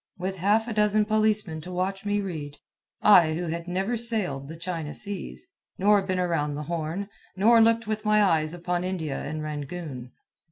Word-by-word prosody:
with 190 +1 -3
half 210 +5 +2
a 230 - -3
dozen 210 0 +3
policemen 215 -6 +1
to 180 - -9
watch 195 +2 -2
me 205 0 +1
read 155 -7 -6 0.5
I 175 -7 +7
who 175 +2 -2
had 170 +1 -4
never 190 +7 -1
sailed 205 - -1
the 160 +2 -8
China 165 -3 -4
seas, 65 - -5 0.3
nor 205 +1 +4
been 185 -1 -2
around 165 -5 0
the 150 - -4
Horn, 170 +4 -3 0.3
nor 225 +4 +5
looked 230 0 +4
with 215 0 -3
my 215 -1 +4
eyes 160 -5 +2
upon 175 +1 -2
India 165 -7 -3
and 155 +1 -4
Rangoon. 145 -4 -6
180 Hz, 175 wpm, -26 LUFS, 155-210 Hz, 0.5 s, I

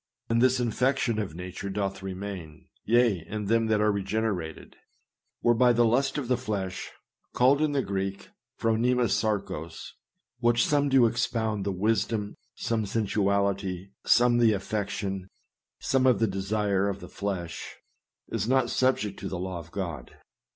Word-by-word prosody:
And 115 0 +2
this 130 0 +4
infection 125 -1 +1
of 95 -7 -4
nature 90 +2 -6
doth 100 0 -2
remain, 95 -5 -7 0.2
yea, 115 -6 +3
in 105 0 -4
them 115 +2 +2
that 110 -1 +2
are 105 0 +4
regenerated; 100 -4 -3 0.7
whereby 120 +1 +4
the 120 0 +4
lust 135 +5 +2
of 140 -4 -3
the 125 0 +2
flesh, 100 -6 -4 0.5
called 135 +4 +4
in 155 -1 +1
the 135 -2 +1
Greek, 95 -1 -3 0.3
phronema 120 +2 +2
sarkos, 95 -7 -2 0.5
which 120 0 +3
some 145 -1 +2
do 130 -3 +6
expound 115 -3 0
the 100 - 0
wisdom, 105 +2 0 0.2
some 110 -3 -1
sensuality, 100 -2 0
some 120 0 +4
the 115 -2 +5
affection, 100 -1 -3 0.5
some 130 -1 +1
the 115 - +2
desire, 100 0 0
of 100 0 -4
the - - -9
flesh, 95 -5 -5 0.5
is 110 -2 -2
not 130 -1 +2
subject 105 -6 +1
to - - -5
the 95 - -4
Law 90 0 -4
of 85 0 -11
God. 85 -4 -5
105 Hz, 145 wpm, -27 LUFS, 95-120 Hz, 0.7 s, do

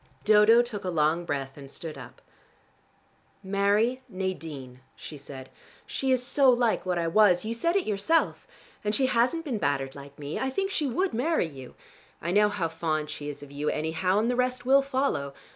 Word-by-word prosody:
Dodo 215 +3 +6
took 220 -4 -6
a 185 - -2
long 165 +1 +1
breath 135 -3 -4
and 140 -1 -10
stood 155 +2 -8
up. 125 -3 -12 1.2
"Marry 205 +6 +1
Nadine," 160 - -5 0.2
she 155 - -9
said. 135 -2 -10 0.3
"She 265 -1 -2
is 250 -1 +2
so 275 +1 +4
like 240 -5 +2
what 180 -1 0
I 170 -1 0
was: 180 +1 +4
you 225 - -2
said 335 +10 0
it 395 - +2
yourself. 215 +11 0 0.4
And 210 0 0
she 270 - +2
hasn't 255 +7 +1
been 245 -8 -2
battered 140 -4 -1
like 140 0 -12
me. 145 +1 -5
I 265 - -1
think 390 +8 -2
she 300 -6 0
would 365 +10 -1
marry 255 - +1
you. 135 -5 -11 0.4
I 170 - -3
know 210 +2 +4
how 195 -5 -1
fond 155 -2 -2
she 150 -1 -6
is 145 0 -8
of 145 - -12
you, 145 +1 -2
anyhow, 160 +5 0
and 220 +2 +2
the 245 - +1
rest 250 0 -1
will 270 +2 +6
follow. 260 - -1
195 Hz, 195 wpm, -27 LUFS, 150-245 Hz, 1.2 s, Dodo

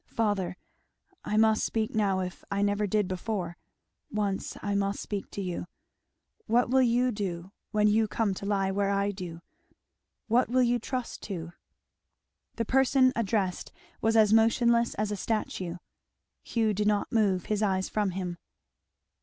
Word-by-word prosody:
"Father 195 -5 -1 0.7
I 210 - -1
must 220 0 +4
speak 220 -1 -1
now 195 -3 +1
if 180 -1 -6
I 200 0 0
never 205 +1 +1
did 210 0 +1
before 185 -2 -3 0.5
once 205 -2 -2
I 205 - -1
must 200 0 0
speak 200 -2 -4
to 200 - -5
you, 180 -1 -4 0.8
what 240 +1 +2
will 265 0 +5
you 245 +1 +3
do 190 -4 -4 0.2
when 210 -1 +3
you 215 +1 +3
come 210 -2 0
to 200 +1 -6
lie 195 -2 +1
where 200 0 0
I 200 0 +1
do? 175 -3 -8 0.8
what 235 +1 +2
will 255 +1 +3
you 240 0 +2
trust 250 +1 -4
to?" 170 -3 -5 1.0
The 230 - -1
person 260 +1 +4
addressed 200 -5 -1 0.3
was 225 0 +2
as 215 -1 +5
motionless 235 +1 +3
as 210 0 -1
a - - -1
statue. 190 -4 -2 0.7
Hugh 225 -2 0
did 210 +1 0
not 210 -1 +1
move 200 -5 +2
his 210 -1 -1
eyes 190 -3 +1
from 210 -2 0
him. 180 -2 -4
210 Hz, 155 wpm, -28 LUFS, 190-225 Hz, 1.0 s, will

